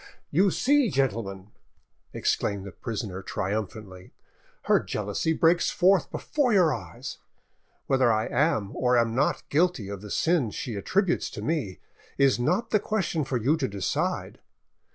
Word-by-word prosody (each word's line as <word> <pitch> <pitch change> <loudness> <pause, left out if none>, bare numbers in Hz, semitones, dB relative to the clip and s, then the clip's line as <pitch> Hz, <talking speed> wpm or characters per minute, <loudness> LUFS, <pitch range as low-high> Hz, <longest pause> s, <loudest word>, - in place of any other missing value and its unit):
"You 190 +6 +4
see, 275 +5 +2
gentlemen," 105 - -2 0.6
exclaimed 100 -1 -1
the 100 - -7
prisoner 100 -1 -5
triumphantly, 100 -1 -5 0.5
"her - - +4
jealousy 105 +9 -2
breaks 165 +2 +3
forth 185 -4 +3
before 285 -5 0
your 180 -7 +4
eyes. 100 -9 -7 0.7
Whether 130 -3 +3
I 110 0 +1
am, 110 -10 0
or 125 -1 +2
am 115 -1 +2
not, 135 +5 0
guilty 150 - +1
of 100 -1 -6
the 105 - -9
sin 160 - +1
she 115 +3 -5
attributes 180 - 0
to - - -7
me, 145 - -2 0.4
is 135 -3 +3
not 195 - 0
the 215 - +4
question 195 -7 -1
for 130 -2 -1
you 130 +7 +2
to 135 -4 -1
decide. 100 -2 -2
130 Hz, 145 wpm, -26 LUFS, 105-170 Hz, 0.7 s, You